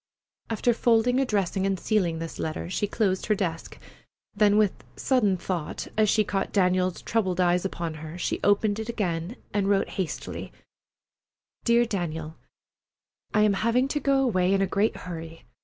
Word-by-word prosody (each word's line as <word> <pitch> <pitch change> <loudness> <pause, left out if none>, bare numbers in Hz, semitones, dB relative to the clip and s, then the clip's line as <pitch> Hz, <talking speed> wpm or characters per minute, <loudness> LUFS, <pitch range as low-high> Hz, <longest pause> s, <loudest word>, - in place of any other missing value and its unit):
After 230 +2 +1
folding, 240 +2 +3
addressing, 200 -7 0
and 195 -2 -1
sealing 180 -7 +1
this 165 0 -6
letter, 160 +2 -4
she 205 - 0
closed 195 -3 0
her 215 - +3
desk; 170 -5 -4 0.6
then 205 0 +4
with 210 -3 +1
sudden 215 -8 +2
thought, 175 -3 -4
as 215 -1 +3
she 215 - +3
caught 195 -1 -2
Daniel's 185 -2 +1
troubled 190 -5 0
eyes 180 0 +2
upon 170 -4 -3
her, 160 +2 -7
she - - -2
opened 205 +1 +2
it 220 +1 -5
again 185 -3 -2 0.2
and 200 -1 +1
wrote 200 -1 +2
hastily: 175 - -5 1.1
DEAR 235 0 +4
DANIEL: 165 -7 -4 1.0
I 210 - +5
am 210 -1 +4
having 230 +6 +2
to 295 - 0
go 275 -1 +2
away 185 -7 +2
in 195 - +1
a - - +3
great 200 +3 +1
hurry. 165 -2 -8
195 Hz, 160 wpm, -26 LUFS, 180-220 Hz, 1.1 s, I